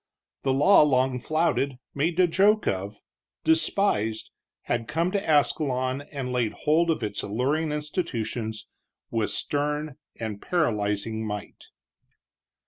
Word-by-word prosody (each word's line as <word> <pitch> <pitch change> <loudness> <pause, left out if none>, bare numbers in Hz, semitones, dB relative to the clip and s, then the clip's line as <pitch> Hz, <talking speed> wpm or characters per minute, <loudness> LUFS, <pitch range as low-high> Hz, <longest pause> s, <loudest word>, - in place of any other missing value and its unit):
The 135 - +1
law 145 +10 +6
long 130 -3 +2
flouted, 155 -2 0 0.2
made 160 +5 0
a 185 - +7
joke 200 +5 +3
of, 100 +2 -3 0.4
despised, 160 - +1 0.3
had 120 -1 -2
come 165 +4 0
to 200 0 -1
Ascalon 130 -2 +1
and 130 -4 -4
laid 120 -4 0
hold 165 +3 +2
of 160 -7 0
its 105 -1 -3
alluring 140 +9 -1
institutions 120 - -3 0.5
with 115 -2 0
stern 150 0 -2 0.2
and 110 -3 -4
paralyzing 110 - 0
might. 105 -2 -6
135 Hz, 120 wpm, -26 LUFS, 110-160 Hz, 0.5 s, a